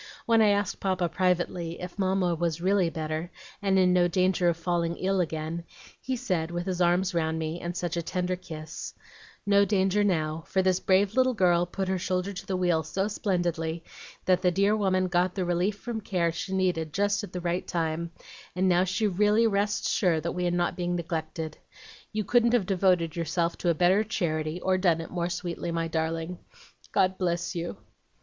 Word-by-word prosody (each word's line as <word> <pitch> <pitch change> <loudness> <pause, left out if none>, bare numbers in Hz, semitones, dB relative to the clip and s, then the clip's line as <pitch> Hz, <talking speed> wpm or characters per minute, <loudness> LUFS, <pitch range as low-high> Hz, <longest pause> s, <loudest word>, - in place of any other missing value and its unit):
When 230 -1 +4
I 215 - +6
asked 205 -1 0
Papa 185 -3 0
privately, 175 -1 0
if 180 +2 -8
Mamma 190 -2 +1
was 170 -1 -1
REALLY 185 0 +2
better 155 +1 -4 0.3
and 195 -1 +2
in 180 -1 +4
no 175 -1 +4
danger 185 0 +2
of 165 - -1
falling 170 0 -1
ill 190 0 +1
again, 160 0 -3 0.4
he 260 - -2
said, 185 -10 -1
with 175 0 -3
his 185 -2 -2
arms 180 +2 +2
round 160 -1 0
me, 160 +1 -3
and 175 +1 -4
such 175 -1 -2
a 170 - 0
tender 180 +2 -2
kiss, 160 -3 -8 0.5
"'No 200 0 +5
danger 200 0 +2
now, 160 -4 0
for 190 - +1
this 185 -1 +2
brave 195 +2 +2
little 255 0 +3
girl 175 -3 +3
put 190 +1 -3
her 190 0 0
shoulder 185 +2 -1
to 180 - -7
the 190 - -1
wheel 175 -3 +2
so 190 +5 -2
splendidly, 175 -5 -1 0.4
that 185 -1 +3
the 180 - +4
dear 200 +4 +2
woman 185 -3 +1
got 180 0 +1
the 185 -3 -1
relief 175 +4 0
from 225 +1 -5
care 180 -5 0
she 170 +3 -5
needed 180 -5 0
just 205 +2 +1
at 205 - -7
the 180 - -4
right 175 +1 -2
time, 165 0 -2 0.5
and 185 +1 +2
now 180 0 +4
she 190 +3 0
really 210 +3 +3
rests 205 -1 +1
sure 175 -5 +2
that 170 +2 -3
we 180 0 -1
are - - +2
not 175 0 0
neglected. 165 -2 -3 0.5
You 215 0 -1
couldn't 235 +3 +3
have 235 -6 +3
devoted 180 -4 +2
yourself 170 0 -1
to 175 - 0
a 170 - +3
better 185 +5 +4
charity, 160 -6 -2
or 185 0 +1
done 175 -3 +3
it 165 - -7
more 175 -1 -1
sweetly, 175 -1 -4
my 165 0 -1
darling. 165 +2 -2 0.5
God 185 0 +2
bless 175 -1 -1
you!'" 170 - -4
180 Hz, 195 wpm, -27 LUFS, 170-190 Hz, 0.5 s, I